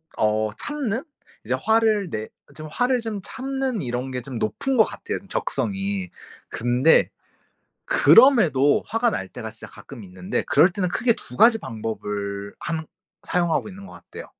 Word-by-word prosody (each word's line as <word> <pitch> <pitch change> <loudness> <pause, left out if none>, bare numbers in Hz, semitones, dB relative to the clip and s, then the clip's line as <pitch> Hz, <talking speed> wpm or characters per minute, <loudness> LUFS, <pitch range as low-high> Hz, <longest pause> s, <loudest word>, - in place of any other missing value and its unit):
어 110 0 +1
참는 275 -5 -3 0.4
이제 - - 0
화를 220 -4 +2
내 110 0 -4 0.3
좀 155 0 -8
화를 245 0 +1
좀 220 -3 -4
참는 265 -5 -3
이런 125 0 -3
게 125 -1 -4
좀 130 -1 -7
높은 265 - -1
것 220 - +6
같아요 - - -5
적성이. 195 - -2 0.4
근데 125 +6 +3 0.8
그럼에도 190 - +5
화가 225 +2 +1
날 95 - -3
때가 115 -3 -7
진짜 110 - -12
가끔 105 +1 -12
있는데 90 -1 -3
그럴 150 +5 +5
때는 180 -1 -2
크게 235 +5 +2
2 125 - -9
가지 225 0 +7
방법을 105 - -5
함 160 -1 -3 0.4
사용하고 175 +2 0
있는 195 +1 -11
것 - - -13
같아요. - - -11
175 Hz, 280 characters per minute, -23 LUFS, -, 0.8 s, 가지